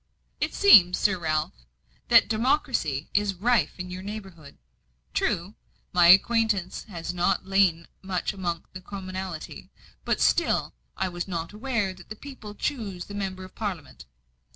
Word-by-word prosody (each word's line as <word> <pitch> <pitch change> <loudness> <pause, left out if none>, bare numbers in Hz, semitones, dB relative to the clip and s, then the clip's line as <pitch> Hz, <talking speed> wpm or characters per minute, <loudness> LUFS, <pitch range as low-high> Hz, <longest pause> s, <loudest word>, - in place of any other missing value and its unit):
"It - - -2
seems, 185 - +7
Sir 190 -3 +1
Ralph, 155 -2 -1 0.5
that - - +6
democracy 220 - 0
is 200 -1 +1
rife 205 -4 +1
in 180 0 -6
your 180 +1 -6
neighbourhood. 190 -7 -9 0.6
True, 175 +5 -1 0.4
my 175 -1 +6
acquaintance 200 0 +4
has 175 -3 -6
not 180 +1 0
lain 190 -4 +2
much 190 +1 -2
among 175 -4 -3
the 185 - -8
commonalty, 185 -3 -7 0.3
but - - 0
still - - +2 0.2
I - - 0
was 175 0 -5
not 170 -1 -4
aware 215 -4 -1
that 185 -1 -16
the 215 - -6
people 220 -5 -10
choose 205 -10 -3
the 205 - -10
Member 190 -2 -4
of 185 - -12
Parliament." 185 -10 -6
190 Hz, 145 wpm, -26 LUFS, 175-210 Hz, 0.6 s, seems